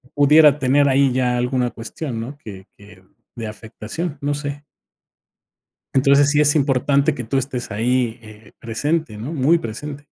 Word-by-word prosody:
pudiera 150 Hz, 0 st, +6 dB
tener 140 Hz, +1 st, +3 dB
ahí 135 Hz, 0 st, +3 dB
ya 125 Hz, -1 st, 0 dB
alguna 125 Hz, 0 st, 0 dB
cuestión, 115 Hz, +1 st, -6 dB
¿no?, 135 Hz, +5 st, -8 dB
que 100 Hz, -8 st, -11 dB
que 100 Hz, -2 st, -17 dB, 0.3 s
de 115 Hz, -2 st, -5 dB
afectación, 110 Hz, +9 st, -6 dB
no 145 Hz, +1 st, -1 dB
sé. 145 Hz, 0 st, -6 dB, 1.3 s
Entonces, 140 Hz, +1 st, +4 dB
sí 150 Hz, 0 st, +3 dB
es 145 Hz, -1 st, +3 dB
importante 140 Hz, 0 st, +2 dB
que 125 Hz, -, -6 dB
tú 135 Hz, +5 st, -1 dB
estés 130 Hz, -3 st, -4 dB
ahí, 120 Hz, +2 st, 0 dB
eh, 110 Hz, -1 st, -15 dB
presente, 145 Hz, +3 st, -2 dB
¿no?, 120 Hz, +9 st, -6 dB
muy 155 Hz, +3 st, +3 dB
presente. 145 Hz, +3 st, -7 dB
135 Hz, 155 wpm, -20 LUFS, 115-145 Hz, 1.3 s, pudiera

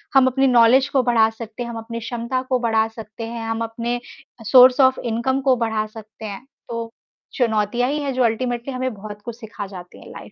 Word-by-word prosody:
हम 265 Hz, -1 st, +6 dB
अपनी 270 Hz, +1 st, +2 dB
नॉलेज 250 Hz, +2 st, +5 dB
को 270 Hz, -2 st, +2 dB
बढ़ा 230 Hz, -2 st, +4 dB
सकते 225 Hz, +1 st, -7 dB
हैं, 235 Hz, -, -6 dB
हम 235 Hz, -, -6 dB
अपने 230 Hz, +1 st, -6 dB
क्षमता 235 Hz, +2 st, -3 dB
को 255 Hz, -1 st, +2 dB
बढ़ा 225 Hz, -2 st, +2 dB
सकते 225 Hz, 0 st, -9 dB
हैं, 230 Hz, 0 st, -5 dB
हम 225 Hz, 0 st, -2 dB
अपने 230 Hz, +1 st, -3 dB
अ, 240 Hz, -1 st, -16 dB
सोर्स 255 Hz, +3 st, +7 dB
ऑफ 260 Hz, -, -2 dB
इनकम 240 Hz, +4 st, 0 dB
को 265 Hz, -1 st, +3 dB
बढ़ा 220 Hz, -2 st, -1 dB
सकते 215 Hz, 0 st, -11 dB
हैं। 205 Hz, +4 st, -7 dB, 0.2 s
तो, 230 Hz, -1 st, -4 dB, 0.4 s
चुनौतियाँ 230 Hz, +1 st, +1 dB
ही 295 Hz, +2 st, -1 dB
हैं, 275 Hz, -1 st, -2 dB
जो 255 Hz, 0 st, +1 dB
अल्टीमेटली 240 Hz, +2 st, -1 dB
हमें 255 Hz, 0 st, -2 dB
बहुत 210 Hz, 0 st, -9 dB
कुछ 235 Hz, -, -6 dB
सीखा 220 Hz, -3 st, -7 dB
जाती 180 Hz, -2 st, -11 dB
है -, -, -13 dB
लाइफ -, -, -11 dB
230 Hz, 215 wpm, -21 LUFS, 220-255 Hz, 0.4 s, सोर्स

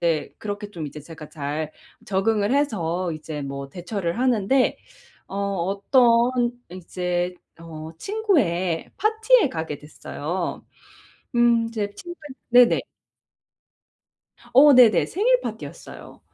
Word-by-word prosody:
제 165 Hz, -3 st, 0 dB
그렇게 205 Hz, 0 st, -5 dB
좀 160 Hz, -6 st, -6 dB
이제 150 Hz, +1 st, -9 dB
제가 155 Hz, 0 st, -11 dB
잘 150 Hz, +1 st, -4 dB, 0.3 s
적응을 205 Hz, +4 st, +1 dB
해서 185 Hz, -, 0 dB
이제 155 Hz, -2 st, -6 dB
뭐 140 Hz, 0 st, -6 dB
대처를 180 Hz, -, -4 dB
하는데 255 Hz, +1 st, +2 dB, 0.5 s
어 195 Hz, -, -8 dB
어떤 235 Hz, +6 st, +2 dB, 0.2 s
이제 180 Hz, 0 st, -3 dB, 0.2 s
어 160 Hz, -1 st, -9 dB
친구의 210 Hz, -, 0 dB
파티에 440 Hz, -, +3 dB
가게 160 Hz, -, -5 dB
됐어요. 160 Hz, +3 st, -5 dB, 0.7 s
음 235 Hz, -1 st, +4 dB
이제 215 Hz, -3 st, -3 dB
친구의 345 Hz, 0 st, -10 dB, 0.3 s
네네. 245 Hz, 0 st, +6 dB, 1.7 s
어, 285 Hz, +3 st, +8 dB
네네. 230 Hz, -7 st, +6 dB
생일 -, -, +2 dB
파티였어요. -, -, -9 dB
195 Hz, 215 characters per minute, -23 LUFS, 165-245 Hz, 1.7 s, 어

